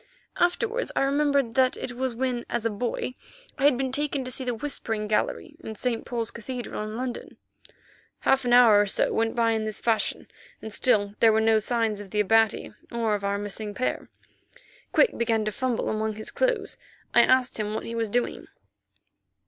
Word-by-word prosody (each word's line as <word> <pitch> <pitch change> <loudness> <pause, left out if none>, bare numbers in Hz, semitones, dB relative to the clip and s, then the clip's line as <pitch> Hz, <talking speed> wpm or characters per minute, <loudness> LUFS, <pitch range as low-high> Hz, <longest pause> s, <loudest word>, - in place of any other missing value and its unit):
Afterwards 445 +7 0
I - - +2
remembered 280 -3 +1
that 255 +1 +3
it - - -5
was 250 0 -3
when, 250 -1 -1
as 235 -1 -2
a 230 - +1
boy, 240 +3 -3 0.5
I 275 - +2
had 285 -4 +5
been 265 0 -1
taken 285 0 -1
to 255 - -4
see 260 - -2
the 245 -2 -2
Whispering 225 -4 -3
Gallery 255 +9 -1
in 220 - -6
St. 235 +1 -1
Paul's 230 -2 -2
Cathedral 240 -1 -6
in 215 +1 -5
London. 250 -1 -5 0.8
Half 270 0 +3
an 245 - -1
hour 235 -4 +7
or 205 - 0
so - - +1
went 225 0 0
by 230 -1 +2
in 220 -1 -1
this 215 -2 -5
fashion, 225 -3 -1 0.3
and 220 - -8
still 205 -5 +2
there 225 - +6
were 220 - +3
no 220 0 +4
signs 225 -2 0
of 205 -1 -9
the 210 - -2
Abati 225 +1 +2 0.2
or 230 -2 0
of 205 -1 -2
our 200 0 0
missing 205 +1 -5
pair. 255 - -2 0.8
Quick 470 - +3
began 225 -2 +1
to 215 - -1
fumble 255 +1 -1
among 215 0 -1
his 215 - -7
clothes. 480 -5 -1 0.3
I - - +7
asked 255 -2 +3
him 210 0 -2
what - - -4
he 230 - -5
was 230 -2 -1
doing. 245 +3 -2
230 Hz, 195 wpm, -26 LUFS, 215-255 Hz, 0.8 s, hour